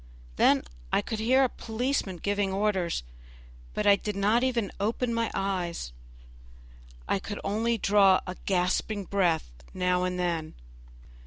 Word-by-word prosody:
Then - - +4 0.3
I - - +2
could 220 - -4
hear 255 +5 +4
a - - +4
policeman 230 -4 -2
giving 200 +2 -1
orders, 190 - 0 0.7
but 210 - -1
I 200 -1 +7
did 210 +1 -4
not 210 +5 +2
even 240 -5 0
open 230 +4 0
my 230 0 0
eyes; 180 - -2 1.1
I - - +1
could 205 +1 -6
only 225 +3 0
draw 200 -2 +5
a 180 - -5
gasping 195 +2 0
breath 175 - 0 0.2
now 180 0 +1
and 180 0 -1
then. 170 -3 -2
200 Hz, 140 wpm, -28 LUFS, 180-220 Hz, 1.1 s, I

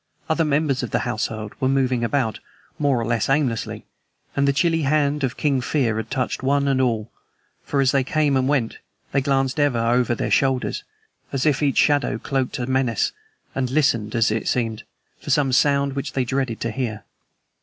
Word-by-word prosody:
Other 160 +1 +2
members 145 -3 +1
of 120 - -4
the - - 0
household 110 -2 -3
were 130 - +1
moving 130 -3 +1
about, 115 -3 0 0.4
more 140 -4 +2
or 115 - -2
less 115 +1 0
aimlessly, 135 -5 0 0.5
and 140 0 +2
the - - +5
chilly 165 +3 +1
hand 145 0 +1
of 130 -3 -1
King 140 -4 +1
Fear 125 -5 0
had 110 - -4
touched 130 -1 -2
one 140 +1 +1
and 135 -1 +2
all, 115 -3 -1 0.5
for, 140 - 0
as 130 -1 +3
they 135 -2 +2
came 150 -1 +1
and 130 0 +2
went, 135 -6 0 0.3
they 140 - +2
glanced 135 +1 0
ever 145 -4 +2
over 120 +1 +2
their - - -3
shoulders, 135 -2 +1 0.5
as 135 +1 -1
if 150 -2 +2
each 140 -2 +1
shadow 145 -1 +3
cloaked 135 -2 -2
a 125 - -2
menace, 130 -4 +1 0.4
and 130 -2 -1
listened, 120 -7 +1
as 115 -1 +3
it 110 0 -2
seemed, 115 -3 -1 0.4
for - - -9
some 135 -1 +2
sound 140 +1 +3
which 140 0 -4
they 130 -2 0
dreaded 130 -2 -2
to 115 - -1
hear. 110 -4 -3
130 Hz, 190 wpm, -22 LUFS, 120-140 Hz, 0.5 s, the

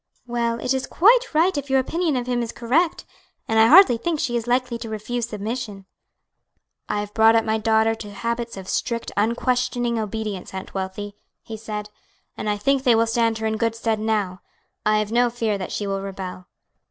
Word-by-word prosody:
"Well, 235 -1 -1
it 250 - 0
is 265 0 -2
quite 465 +7 +4
right 330 +4 +3
if 285 -1 -4
your 265 0 +4
opinion 320 +3 0
of 245 -1 -1
him 245 -1 0
is 230 - -3
correct; 315 +9 0 0.4
and 225 0 +2
I 220 - +7
hardly 315 -4 +8
think 320 +5 -2
she 260 -7 -1
is 235 0 -2
likely 245 -1 0
to 230 - -6
refuse 230 +2 -3
submission." 210 -2 -5 1.0
"I 205 - 0
have 205 0 -7
brought 225 0 +5
up 225 - +3
my 220 0 0
daughter 220 0 +3
to 210 -2 -8
habits 235 +1 -3
of 190 -1 -8
strict, 230 +3 -2
unquestioning 240 +1 0
obedience, 215 -3 -4
Aunt 190 - -7
Wealthy," 195 +2 -5 0.3
he 225 - -7
said, 210 -1 -6 0.4
"and 215 - -3
I 205 - 0
think 270 +6 +1
they 250 -3 +4
will 225 +1 +3
stand 230 -1 +1
her 220 - -4
in 220 0 0
good 230 0 0
stead 225 -1 -1
now. 210 -4 -1 0.5
I 215 0 +4
have 215 0 -1
no 240 +1 +3
fear 225 -4 -1
that 185 - -5
she 205 - -3
will 195 -1 -2
rebel." 190 -2 -7
225 Hz, 200 wpm, -23 LUFS, 210-245 Hz, 1.0 s, hardly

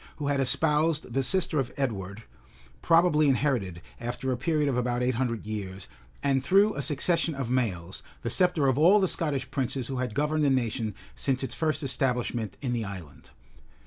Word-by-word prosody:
who 145 -1 -3
had 140 -1 +1
espoused 150 +1 +3
the 135 - +1
sister 165 +1 +2
of 125 -2 -2
Edward, 105 -5 -3 0.6
probably 165 -3 +4
inherited, 120 - -1 0.2
after 120 +2 -3
a - - 0
period 150 +4 0
of 135 - 0
about 125 0 -1
eight 125 +1 +1
hundred 115 -3 -2
years, 100 -3 -6 0.4
and 135 -2 +1
through 200 +8 +4
a 145 - -3
succession 160 +3 0
of 130 -3 -4
males, 95 -9 -2 0.2
the 115 - -2
sceptre 175 -3 +2
of 130 +1 +1
all 185 +7 +6
the 190 - +2
Scottish 140 -6 -2
princes 130 -2 -3
who 135 - -3
had 125 -4 -3
governed 150 +2 0
the 145 - +3
nation 115 -5 -1 0.2
since 135 -1 -1
its 130 - -4
first 155 -1 -1
establishment 125 -5 -1
in 125 -2 -1
the 115 -2 -1
island. 95 -7 -9
130 Hz, 180 wpm, -27 LUFS, 120-150 Hz, 0.6 s, all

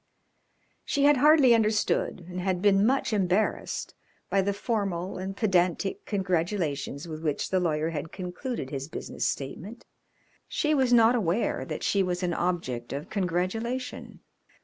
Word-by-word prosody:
She 280 - 0
had 290 0 +6
hardly 290 -2 +6
understood 215 -5 +1
and 180 0 -5
had 185 -1 0
been 200 +1 +4
much 265 -2 +1
embarrassed 195 +1 0 0.4
by 195 - +3
the 200 +1 0
formal 195 -5 -2
and 195 +1 -5
pedantic 190 -1 +1
congratulations 170 -7 -1
with 155 -1 -6
which 150 -3 -2
the 190 - +3
lawyer 160 -2 0
had 160 0 -5
concluded 180 - -5
his 135 -1 -4
business - - -3
statement. 170 - -5 0.6
She 305 0 0
was 265 -4 +2
not 230 -1 +6
aware 210 -2 0
that - - -5
she 200 - +2
was 180 0 -1
an 175 -1 0
object 165 -10 -2
of 145 +5 -6
congratulation. 210 +7 -2
190 Hz, 145 wpm, -27 LUFS, 170-220 Hz, 0.6 s, had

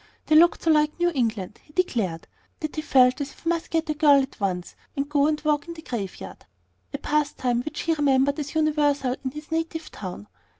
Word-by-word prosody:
They 310 - +3
looked 340 +2 +5
so 325 - +4
like 300 +1 +2
New 350 0 +3
England, 225 -8 -2
he 300 - -22
declared, 220 - -1 0.3
that 310 -1 -4
he 310 - -2
felt 255 -2 +4
as 280 - -3
if - - -20
he 330 - 0
must 340 -1 -1
get 325 -1 0
a 305 - 0
girl 295 -2 +5
at 270 0 -4
once, 180 -3 -2 0.2
and 275 +1 -1
go 290 0 +2
and 305 -1 0
walk 300 +1 0
in 335 - -7
the 320 - -11
graveyard, 195 - -6 0.5
a - - -3
pastime 285 -5 0
which 305 +3 -5
he 330 - +1
remembered 280 -1 +2
as 290 +1 -5
universal 295 -4 +2
in 260 - -1
his 300 +3 -10
native 325 -1 -3
town. 180 - -7
295 Hz, 215 wpm, -25 LUFS, 255-310 Hz, 0.5 s, looked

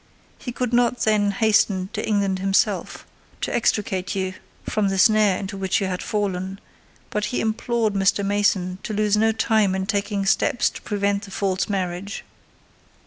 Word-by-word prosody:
He 245 - -5
could 245 0 -3
not 245 0 +2
then 210 -2 +2
hasten 210 -3 +2
to 215 - -3
England 200 -3 0
himself, 195 +1 0 0.4
to - - -2
extricate 195 -5 0
you 190 -1 -2 0.3
from 210 -2 0
the 195 0 -1
snare 210 -1 +4
into 195 0 -5
which 190 -1 0
you 195 - -1
had 185 -1 -3
fallen, 195 -2 -2 0.5
but 210 0 -1
he 245 - -2
implored 225 0 0
Mr. 195 0 +2
Mason 195 -2 +1
to 215 - -5
lose 210 0 +2
no 220 +1 +3
time 220 -3 +2
in 190 0 -2
taking 200 -1 -1
steps 240 - +2
to - - -10
prevent 200 0 -1
the - - -12
false 190 0 -1
marriage. 190 +1 -3
200 Hz, 165 wpm, -23 LUFS, 190-215 Hz, 0.5 s, snare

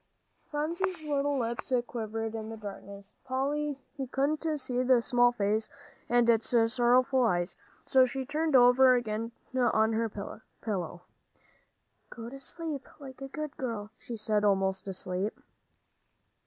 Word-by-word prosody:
Phronsie's 335 +4 -2
little 285 -1 0
lips 235 0 -3
quivered. 225 -1 -4
In 220 -1 -5
the 225 - -6
darkness 200 -1 -9
Polly 275 +2 -1 0.3
couldn't 285 +4 0 0.2
see 255 -1 0
the 255 -1 +5
small 245 0 +4
face 215 -1 0 0.4
and 240 0 +4
its 230 +1 +3 0.2
sorrowful 250 +2 +4
eyes, 175 -5 +1 0.3
so 260 -1 +5
she 265 +1 -4
turned 305 +1 0
over 250 +1 +7
again 230 -1 -2 0.2
on 225 -3 +3
her 225 0 0
pillow. 200 -3 -6 1.1
"Go 230 0 -8
to 275 - -8
sleep, 295 0 -5
like 270 -2 -11
a 270 - -4
good 305 +1 -5
girl," 220 -5 -4
she 235 +1 -7
said, 215 -1 0
almost 195 -1 +1
asleep. 190 +2 -2
240 Hz, 130 wpm, -30 LUFS, 215-270 Hz, 1.1 s, over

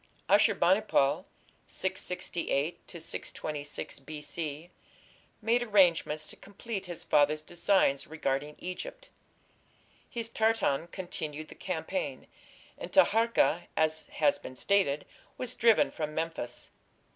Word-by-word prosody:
Ashur - - +5
bani 190 +4 +4
pal 140 -10 +2 0.4
(668 175 -4 -2
626 150 -4 -4
B.C.) 150 +3 -5 0.7
made 235 +2 +3
arrangements 175 -8 +3
to - - -7
complete 200 -1 -6
his 175 -2 -5
father's 150 +1 +3
designs 170 -4 +2
regarding 150 -1 -2
Egypt. - - -7 1.0
His 230 -1 -3
Tartan 220 -10 +1
continued 155 -5 -5
the - - -9
campaign, 185 - -3 0.5
and - - -6
Taharka, 225 - +4
as 155 0 +1
has 150 -2 +2
been 130 - -9
stated, 150 -2 +2 0.3
was 250 -1 -2
driven 230 -3 +4
from 155 -1 -4
Memphis. 160 -7 -4
170 Hz, 105 wpm, -30 LUFS, 150-200 Hz, 1.0 s, Ashur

